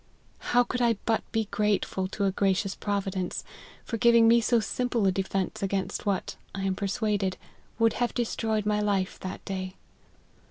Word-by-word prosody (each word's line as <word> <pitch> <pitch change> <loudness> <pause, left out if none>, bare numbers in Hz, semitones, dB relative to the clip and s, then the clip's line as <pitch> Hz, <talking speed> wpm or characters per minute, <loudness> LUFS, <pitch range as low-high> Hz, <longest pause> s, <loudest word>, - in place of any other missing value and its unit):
How 245 0 +3
could 250 +1 -3
I 235 -1 +4
but 225 -1 +2
be 225 -1 +1
grateful 205 -2 0
to 200 +1 -2
a 195 - +2
gracious 195 0 +1
Provi 200 -2 -2
dence, 185 -2 -3 0.4
for 230 - -3
giving 235 0 +6
me 235 +1 +6
so 235 +1 +3
simple 235 +1 0
a 190 - +4
defence 190 0 -2
against 195 +1 -2
what, 195 -2 -1 0.2
I 195 - -3
am 195 -1 +1
persuaded, 200 -1 -1 0.4
would 225 -1 +3
have 240 - +1
destroyed 220 -3 0
my 210 0 +2
life 200 -3 0
that 185 - -6
day. 185 -1 -4
205 Hz, 170 wpm, -28 LUFS, 190-225 Hz, 0.4 s, giving